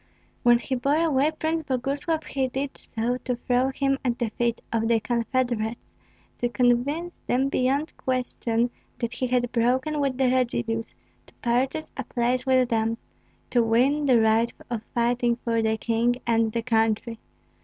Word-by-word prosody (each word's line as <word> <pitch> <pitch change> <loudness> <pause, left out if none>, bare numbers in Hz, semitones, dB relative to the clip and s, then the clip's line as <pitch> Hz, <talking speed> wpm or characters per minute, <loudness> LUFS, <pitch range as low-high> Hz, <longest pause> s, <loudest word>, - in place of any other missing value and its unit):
When 240 0 +6
he 255 +3 -4
bore 275 +4 +1
away 300 -3 +3
Prince 315 +1 -1
Boguslav, 285 +4 -1
he 265 -1 -1
did 270 +2 -4
so 235 +2 -3
to 250 -1 -3
throw 250 +2 +1
him 275 0 0
at 245 -2 0
the 235 -3 -2
feet 235 0 -1
of 225 0 +1
the 230 -1 +3
confederate's, 235 -1 -1 0.5
to 240 - 0
convince 260 +8 +1
them 265 +2 +2
beyond 275 +4 0
question 245 -2 -1 0.3
that 235 -1 -3
he 255 +1 -1
had 245 -1 0
broken 260 +6 +1
with 275 -3 0
the 260 -2 +3
Radzivills, 235 -3 -1 0.3
to - - -20
purchase 260 +6 -1
a 270 - -2
place 245 +2 -1
with 255 -2 +3
them, 225 -1 0 0.5
to 245 - +4
win 260 +6 +2
the 250 -3 +5
right 220 +1 +3 0.2
of 230 -3 -2
fighting 240 0 +2
for 230 -1 -1
the 220 0 +1
king 235 +2 +1
and 225 -1 +2
the 230 +1 -2
country. 225 -1 0
245 Hz, 165 wpm, -25 LUFS, 235-265 Hz, 0.5 s, When